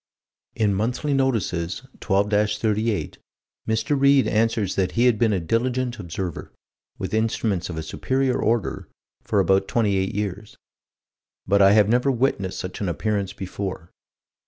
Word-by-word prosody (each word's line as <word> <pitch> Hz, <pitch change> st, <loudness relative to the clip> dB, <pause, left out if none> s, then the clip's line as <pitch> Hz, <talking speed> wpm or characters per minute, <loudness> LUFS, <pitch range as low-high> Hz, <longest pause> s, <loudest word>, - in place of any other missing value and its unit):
In 105 Hz, -3 st, +2 dB
Monthly 125 Hz, +8 st, -1 dB
Notices, 115 Hz, -9 st, -1 dB, 0.2 s
12 100 Hz, 0 st, +1 dB
38, 105 Hz, +1 st, 0 dB, 0.5 s
Mr. 110 Hz, +6 st, 0 dB
Read 140 Hz, -1 st, +5 dB
answers 110 Hz, -3 st, +1 dB
that 95 Hz, -2 st, -1 dB
he 120 Hz, +2 st, +2 dB
had 120 Hz, -4 st, +3 dB
been 115 Hz, -2 st, +3 dB
a 100 Hz, -, +1 dB
diligent 120 Hz, +7 st, -1 dB
observer, 90 Hz, -1 st, -5 dB, 0.5 s
with -, -, -5 dB
instruments 110 Hz, -5 st, 0 dB
of 85 Hz, -, -5 dB
a 80 Hz, -, -3 dB
superior 130 Hz, +5 st, -1 dB
order, 115 Hz, -5 st, -1 dB, 0.3 s
for 105 Hz, -, 0 dB
about 95 Hz, +1 st, +3 dB
28 100 Hz, -5 st, 0 dB
years 105 Hz, 0 st, -4 dB, 0.9 s
"but 100 Hz, 0 st, +3 dB
I 100 Hz, +1 st, +7 dB
have 105 Hz, -1 st, +5 dB
never 125 Hz, +4 st, +2 dB
witnessed 120 Hz, -7 st, 0 dB
such 90 Hz, +2 st, -6 dB
an 100 Hz, -, -1 dB
appearance 100 Hz, +2 st, -1 dB
before." 95 Hz, -3 st, -6 dB
105 Hz, 140 wpm, -23 LUFS, 95-120 Hz, 0.9 s, I